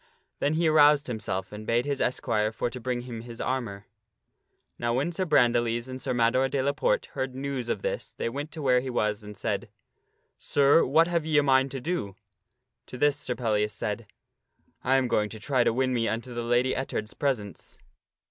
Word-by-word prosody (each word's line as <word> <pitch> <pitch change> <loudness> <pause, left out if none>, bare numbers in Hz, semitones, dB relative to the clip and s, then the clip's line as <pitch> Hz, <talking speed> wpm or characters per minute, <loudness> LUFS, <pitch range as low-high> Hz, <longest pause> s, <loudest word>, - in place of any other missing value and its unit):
Then 145 +2 +1
he 165 +1 +2
aroused 150 -2 +5
himself 110 -5 -3
and 105 +1 -7
bade 120 +2 +2
his 140 -1 -2
esquire 110 -3 0
for 115 +2 -2
to 125 - -7
bring 125 0 -2
him 120 -2 -7
his 120 0 -10
armor. 115 -6 -3 0.9
Now 120 0 0
when 145 +7 0
Sir 185 +2 -2
Brandiles 120 -4 +2
and 130 0 -7
Sir 135 - -2
Mador 125 +2 +2
de 140 +1 -1
la 140 - +2
Porte - - +1
heard 130 -1 -3
news 135 -3 -3
of - - -2
this - - -3
they - - -2
went 145 +6 -4
to 160 -2 -6
where 125 -2 +4
he 130 +1 -5
was 105 -3 -1
and 105 0 -10
said, - - -2 0.4
" - - -46 0.3
Sir, 145 +3 +4
what 160 +5 +4
have 170 -2 0
ye 155 -1 +1
a 145 - +5
mind 135 -1 +4
to 135 - -5
do? 130 - -3 0.4
" 125 +1 -55
To 125 - -8
this 145 +2 +3
Sir 125 - -4
Pellias 105 -3 0
said, 105 +1 -4 0.4
" - - -52 0.3
I 130 - +3
am 130 -1 +3
going 105 -3 +1
to 110 - -9
try 130 +2 +1
to - - +3
win 130 +2 0
me 115 -2 +1
unto 120 +2 -3
the 120 - -3
Lady 120 +2 +2
Ettard's 110 -5 -3
presence." 110 - -3
125 Hz, 215 wpm, -27 LUFS, 115-140 Hz, 0.9 s, aroused